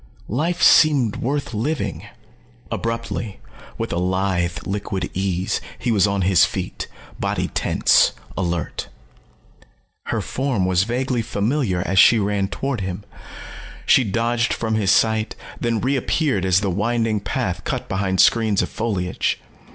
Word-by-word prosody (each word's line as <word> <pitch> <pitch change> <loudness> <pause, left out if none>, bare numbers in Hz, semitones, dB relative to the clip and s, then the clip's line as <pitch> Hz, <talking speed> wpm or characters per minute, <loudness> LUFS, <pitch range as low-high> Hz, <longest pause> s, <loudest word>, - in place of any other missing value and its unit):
Life 160 - -1
seemed 140 -9 +5
worth 140 0 -2
living. 105 - -2 0.6
Abruptly, 115 -2 -3 0.4
with - - -3
a 85 - 0
lithe 90 -1 0
liquid 100 -1 -3
ease, 95 -1 -1 0.2
he 120 - -1
was 105 -3 +4
on 100 -1 0
his 95 -1 +5
feet, - - -2 0.3
body - - -1
tense, - - +3 0.2
alert. 85 -4 -3 1.2
Her - - -1
form 130 -8 -1
was 95 +1 +2
vaguely 125 +1 -1
familiar 105 -3 -1
as 95 +1 +2
she 115 - +7
ran 100 -2 0
toward 135 +2 -3
him. 95 +1 -4 0.8
She 130 - +5
dodged 115 +3 0
from 110 -1 -2
his 105 -3 +1
sight, 110 +2 +2 0.2
then 115 -2 0
re 135 +5 0
appeared 130 - 0
as 95 +1 +3
the 100 -2 0
winding 110 +3 0
path - - -3
cut - - -3
behind 95 -1 -1
screens 110 -4 +4
of - - -4
foliage. 100 -6 -1
105 Hz, 135 wpm, -21 LUFS, 95-120 Hz, 1.2 s, she